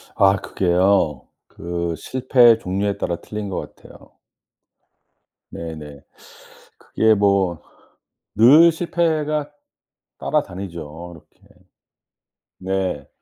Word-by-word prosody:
아 100 0 +4
그게요, 90 -7 0 0.2
그 85 -1 -4
실패의 125 -3 +3
종류에 100 0 -2
따라 85 - -2
틀린 105 +1 -7
것 95 - -6
같아요. - - -18 1.4
네네. 75 -4 -9 0.8
그게 110 0 +1
뭐 100 -4 +1 0.8
늘 150 +9 +7
실패가 155 -3 -1 0.7
따라다니죠 85 -2 -5
이렇게. 80 - -22 1.1
네. 95 -6 -3
95 Hz, 170 characters per minute, -20 LUFS, 85-115 Hz, 1.4 s, 늘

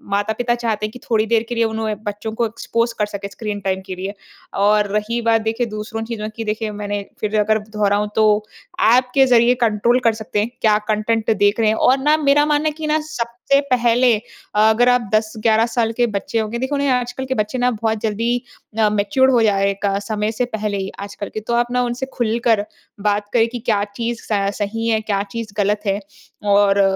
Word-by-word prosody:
माता-पिता 220 +4 0
चाहते 225 -3 -2
हैं 215 - -5
कि 250 - -11
थोड़ी 220 -1 +2
देर 225 0 +2
के 240 - -3
लिए 230 - +2
उन्हें 220 -1 -2
बच्चों 210 +1 -4
को 235 - +1
एक्सपोज 230 +1 -2
कर 210 - +3
सकें 200 -1 -6
स्क्रीन 210 0 -5
टाइम 190 0 -1
के 185 -1 -6
लिए। 190 +2 -5 0.5
और 210 0 +4
रही 230 +3 -2
बात 225 -1 +2
देखिए 225 +2 -1
दूसरों 215 +1 -5
चीज़ों 220 -2 -4
की 230 - -4
देखिए 215 0 -2
मैंने 205 0 -4 0.2
फिर 215 0 0
अगर 215 +1 +2
दोहराऊँ, 210 -1 0
तो 215 -1 +3 0.4
ऐप 250 -5 +4
के 270 -1 +6
ज़रिए 245 -1 +5
कंट्रोल 235 +2 +3
कर 230 - +5
सकते 220 -1 -3
हैं। 215 +3 0
क्या 215 -1 +4
कंटेंट 215 +1 0
देख 205 +2 +2
रहे 220 - +3
हैं। 220 - +2
और 260 +4 +4
ना 300 +3 +3
मेरा 290 0 +3
मानना 300 0 +1
है - - -6
कि 310 -1 -4
ना 310 +1 +2
सबसे 250 -2 -1
पहले 245 0 +4 0.4
अगर 220 +3 +4
आप 245 0 +4
10-11 220 +1 +2
साल 235 -1 0
के 240 -1 +3
बच्चे 210 +2 -2
होंगे, 220 +2 -2
देखो 265 +3 -1
ना 280 - 0
ये 280 - +1
आजकल 250 +1 -1
के 260 - -1
बच्चे 215 +4 -1
ना 250 0 +2
बहुत 220 -1 -1
जल्दी 230 +3 0 0.4
अ, 215 -1 +4
मैच्योर 210 +6 +2
हो 245 -3 +4
जा 205 -3 +3
रहे 195 - +2
हैं 200 - 0
का 200 0 +1
समय 210 0 -2
से 245 +2 -1
पहले 210 -1 -2
ही, 195 0 -4
आजकल 200 0 -6
के। - - -3
तो 220 +2 -4
आप 240 +1 +1
ना 250 - +1
उनसे 240 +2 -2
खुलकर 225 -2 +1 0.4
बात 205 0 -1
करें 230 -1 +4
कि 245 - -4
क्या 215 -3 0
चीज़ 235 0 -3
स 200 -1 +1
सही 225 +3 -2
है, 220 -1 +2
क्या 200 -2 -1
चीज़ 230 -2 -5
गलत 205 +1 +1
है 200 +1 0 0.5
और 200 0 +4
220 Hz, 220 wpm, -19 LUFS, 210-240 Hz, 0.5 s, के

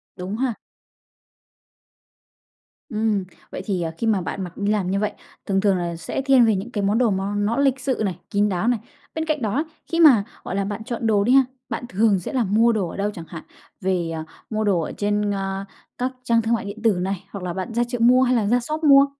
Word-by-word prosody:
Đúng 190 +4 -5
ha. 250 -3 0 2.3
Ừm, 215 -3 0 0.3
vậy - - -5
thì, 190 -5 -1
à, 165 -1 -2
khi 230 - -1
mà 205 -4 +2
bạn 190 +2 -4
mặc 180 -1 -8
đi 205 0 0
làm 190 -3 0
như 200 - +1
vậy, 210 - -1 0.3
thường 195 -1 +1
thường 200 -3 +3
là 170 -1 -2
sẽ 170 - -4
thiên 265 -3 +5
về 220 -2 +3
những 205 +6 -4
cái 205 -3 -2
món 205 +3 +2
đồ 240 -4 +3
nó 195 +2 -1
nó 205 +4 0
lịch 270 -2 +2
sự 260 -3 -1
này, 185 -4 -3
kín 205 +1 +2
đáo 185 +4 -1
này. 240 -3 +2 0.4
Bên 320 0 -1
cạnh 305 -4 -1
đó, 225 +8 0 0.3
khi 335 - 0
mà, 260 -11 +7 0.2
gọi 190 - -4
là, 195 0 0
bạn 205 +2 -4
chọn 230 -1 -3
đồ 205 -2 +3
đi 245 - +2
ha, 270 -1 +7 0.3
bạn 245 - -3
thường 200 0 +3
sẽ 180 - -6
là 250 -3 +2
mua 220 +4 +3
đồ 195 -6 -1
ở - - -8
đâu 205 +1 0
chẳng 165 -2 -8
hạn, 165 -3 -8 0.4
về, 180 -3 0
à, 160 -1 -4 0.3
mua 215 -1 -1
đồ 190 -5 +2
ở - - -4
trên, 205 0 0
a, 195 0 -3 0.3
các 255 +1 -1
trang 230 -1 +3
thương 225 +1 0
mại 220 -3 -1
điện 200 +2 -7
tử 225 - +5
này, 190 0 -2
hoặc 200 -3 -6
là 175 - -3
bạn 190 +6 -4
ra 240 +1 +2
chợ 245 -1 -4
mua 250 +2 +6
hay 250 0 +3
là 220 -3 +2
ra 245 +3 +3
shop 305 +6 -4
mua? 280 -1 +8
210 Hz, 245 wpm, -23 LUFS, 195-240 Hz, 2.3 s, mua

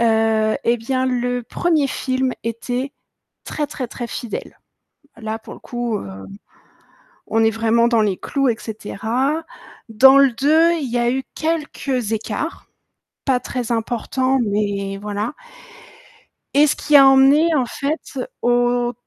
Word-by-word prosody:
Heu 220 -1 +2
et 235 +1 +3
bien, 255 +3 -1
le 245 -1 -1
1er 315 +3 0
film 260 -1 -1
était 245 +4 -3 0.5
très 300 - -3
très 260 -2 -5
très 240 - -6
fidèle. 235 -1 -6 0.6
Là 220 0 -5
pour - - -11
le - - -12
coup, 240 -3 -3
heu, 95 0 -9 1.0
on 225 0 +1
est 225 - +4
vraiment 225 +1 +2
dans 230 -2 +3
les 200 -3 0
clous, 275 -2 -1
et 230 - +1
cetera, 240 +8 -2 0.4
dans 265 +5 +7
le 275 -2 +5
2, 310 +7 +3
il 270 -5 -4
y 240 - 0
a 240 0 +2
eu 265 +1 -1
quelques 285 -7 -2
écarts, 225 +8 -4 0.6
pas 260 -3 +2
très 245 -1 -4
importants, 250 +3 0
mais 200 -1 -1
voilà 210 +4 -3 1.2
et 290 +2 +6
ce - - +1
qui 300 - +1
a 275 -1 +9
emmené 275 +5 +5
en 260 -4 +2
fait 280 +2 -4 0.2
au 245 0 +1
245 Hz, 145 wpm, -20 LUFS, 225-270 Hz, 1.2 s, a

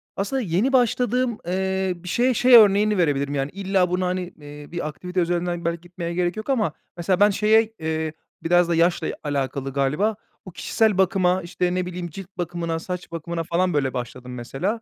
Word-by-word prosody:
Aslında 230 +7 -1
yeni 205 +8 0
başladığım, 245 -1 +2
eee, 190 0 0
bir 175 +1 -10
şeye 250 +4 +2
şey 245 +2 +6
örneğini 210 -1 +6
verebilirim, 145 -4 +1
yani, 135 +1 -1
illa 190 -2 +1
buna, 180 0 0
hani, 185 0 -1 0.2
eee, 145 +1 -11
bir 170 -3 -3
aktivite 180 +4 -4
üzerinden 175 0 -1
belki 170 0 -1
gitmeye 175 -1 -6
gerek 175 +2 -1
yok. 220 - -6
Ama 215 - +1 0.2
mesela 180 +2 0
ben 205 +1 +6
şeye 220 +2 +3
eee, 160 0 -2 0.3
biraz 175 +1 +3
da 170 - +2
yaşla 170 +1 +2 0.2
alakalı 135 -2 -2
galiba, 150 +11 +1 0.3
bu 185 - -9
kişisel 215 +2 +1
bakıma, 185 -1 +2
işte, 180 +1 -2
ne 185 -1 0
bileyim, 180 -1 -5
cilt 190 +3 -9
bakımına, 170 -1 -2
saç 180 0 -6
bakımına 165 0 -4
falan, 180 +1 0
böyle, 135 -3 0
başladım 125 0 -6
mesela. 145 - -3
180 Hz, 180 wpm, -23 LUFS, 165-195 Hz, 0.3 s, şey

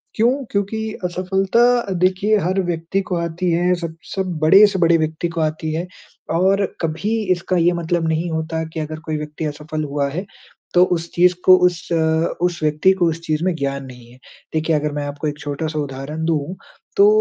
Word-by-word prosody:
क्यों? 235 +4 +3 0.2
क्योंकि 200 +2 -1 0.3
असफलता 195 +5 +2
देखिये 195 +3 +2
हर 190 +1 0
व्यक्ति 175 +2 -1
को 185 -1 -3
आती 170 +1 -1
है। 175 +2 +2
सब 170 -2 -6 0.2
सब 185 -4 -2
बड़े 190 +7 +8
से 195 -2 -2
बड़े 170 -1 +4
व्यक्ति 160 +2 -1
को 165 - 0
आती 155 0 -1
है। 170 +3 -3 0.4
और 190 +4 +3 0.2
कभी 165 +6 -2 0.2
इसका 180 +1 0
ये 175 +1 +4
मतलब 170 0 -1
नहीं 160 +2 -1
होता 160 0 -2
कि 160 - -4
अगर 155 0 -5
कोई 155 -1 -2
व्यक्ति 150 +1 -5
असफल 150 +1 -4
हुआ 140 -1 -1
है 180 +7 -4 0.5
तो 180 - +7
उस 165 0 -5
चीज़ 180 +1 +4
को 185 - +9
उस 175 -2 -5
अ, - - +3 0.5
उस 175 -1 0
व्यक्ति 155 +5 +3
को 175 - +4
उस 160 - -3
चीज 155 0 -1
में 185 0 +1
ज्ञान 140 -2 -3
नहीं 125 -2 -13
है। 125 - -17 0.4
देखिये 160 0 +1
अगर 150 0 -2
मैं 145 0 -3
आपको 145 +2 -4
एक 150 0 -3
छोटा-सा 155 +2 -3
उदाहरण 145 +2 -5
दूँ, 160 +1 -1 0.4
तो 400 - +7
165 Hz, 195 wpm, -20 LUFS, 155-185 Hz, 0.5 s, को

